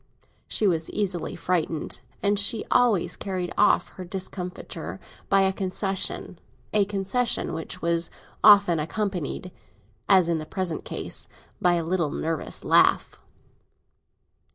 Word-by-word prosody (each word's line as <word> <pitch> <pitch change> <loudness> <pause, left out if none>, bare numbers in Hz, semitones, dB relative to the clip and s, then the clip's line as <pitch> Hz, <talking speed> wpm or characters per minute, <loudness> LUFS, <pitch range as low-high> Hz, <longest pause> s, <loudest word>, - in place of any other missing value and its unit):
She 215 - 0
was 165 -4 +1
easily 185 -6 -2
frightened, 165 -7 -2 0.2
and 200 0 +3
she 210 +2 +4
always 230 -8 +3
carried 185 -2 -4
off 210 - +3
her 185 - -9
discomfiture 180 0 -5 0.3
by 195 0 +5
a 190 0 +2
concession; 190 -1 -3 0.3
a 210 -2 +4
concession 205 +4 0
which 160 0 -4
was 170 0 +2 0.3
often 200 -5 +7
accompanied, 185 0 -3 0.6
as 190 -4 +6
in 170 -1 0
the 155 - -7
present 185 -4 -3
case, - - -5 0.3
by 175 -1 +4
a 170 - -1
little 170 -2 0
nervous 160 +1 -3
laugh. - - +3
185 Hz, 125 wpm, -25 LUFS, 170-200 Hz, 0.6 s, often